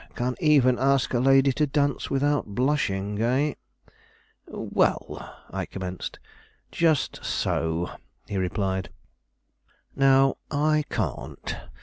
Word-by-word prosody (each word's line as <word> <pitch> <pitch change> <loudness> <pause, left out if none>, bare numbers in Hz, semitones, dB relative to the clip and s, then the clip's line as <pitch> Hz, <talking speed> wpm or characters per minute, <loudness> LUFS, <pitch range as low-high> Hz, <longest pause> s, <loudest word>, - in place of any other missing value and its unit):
Can 125 +1 -1
even 140 -7 +4
ask 135 -1 +2
a 120 - +2
lady 135 +1 +5
to 150 +3 +1
dance 145 0 0
without 140 -6 0
blushing, 105 -7 0
eh?" 135 +5 +2 0.9
"Well, - - -1 0.2
" - - -26
I - - -3
commenced. 95 -1 -6 0.5
"Just 160 -4 +1
so," 80 +1 -1 0.4
he 100 - -3
replied; 95 0 -1 1.1
"now, 135 0 +4
I 150 +1 +2
can't. - - -3
135 Hz, 105 wpm, -26 LUFS, 100-145 Hz, 1.1 s, lady